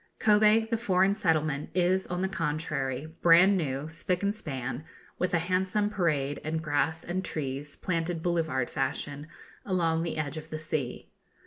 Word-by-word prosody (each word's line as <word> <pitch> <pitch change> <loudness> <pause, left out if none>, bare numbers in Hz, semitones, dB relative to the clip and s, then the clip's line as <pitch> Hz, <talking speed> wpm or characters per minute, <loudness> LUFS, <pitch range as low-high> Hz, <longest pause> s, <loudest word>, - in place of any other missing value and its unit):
Kobe, 215 0 +5
the 230 0 -1
foreign 190 -3 +3
settlement, 155 -7 0
is, 185 +1 +2
on 180 +1 -2
the - - +2
contrary, 150 -6 -2 0.2
bran 175 +4 +7
new, 145 -4 -2
spick 175 +3 -2
and 200 +1 +2
span, 135 - -4 0.4
with 180 - 0
a 175 - +3
handsome 185 +4 0
parade, 150 -8 0
and 160 +1 -1
grass 160 +1 0
and 185 +2 -2
trees, 140 -2 -4
planted 165 -2 -2
boulevard 160 -8 0
fashion, 145 +1 -3 0.4
along 165 -4 +1
the 165 -1 -3
edge 155 0 -3
of 155 +1 -8
the 155 - -4
sea. 155 -5 -3
165 Hz, 155 wpm, -29 LUFS, 150-185 Hz, 0.4 s, bran